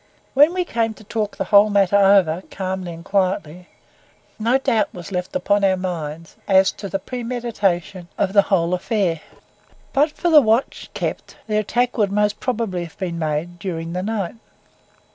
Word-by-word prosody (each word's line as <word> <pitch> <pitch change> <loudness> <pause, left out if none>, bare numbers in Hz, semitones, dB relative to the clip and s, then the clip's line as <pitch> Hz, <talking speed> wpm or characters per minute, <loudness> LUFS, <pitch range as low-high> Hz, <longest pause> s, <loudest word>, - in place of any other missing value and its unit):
When 290 +4 +6
we 365 -1 0
came 225 -6 -1
to 215 - -15
talk 215 0 -3
the - - -1
whole 205 +1 +5
matter 200 -1 +3
over 195 -4 +4
calmly 185 -2 -4
and 170 +1 -10
quietly, 185 -3 -1 0.7
no 235 +4 +3
doubt 225 -5 0
was 175 +1 -9
left 180 +4 -4
upon 205 -7 +1
our 190 -1 +3
minds, 165 -3 -5
as 190 -1 +5
to 200 - -8
the 195 - -1
premeditation 205 -6 -3
of 195 -1 0
the 200 - +7
whole 175 -3 +2
affair. 180 -4 0 0.7
But 295 +3 +3
for 345 - -1
the 305 -2 +8
watch 225 +1 0
kept, - - -4
the 215 -1 -1
attack 240 +3 0
would 205 -2 +2
most 210 +1 +1
probably 220 -8 -2
have 165 - -15
been 175 -4 -4
made 160 +3 -3
during 170 -2 -4
the 180 - -2
night. 200 -3 -2
195 Hz, 170 wpm, -21 LUFS, 180-220 Hz, 0.7 s, the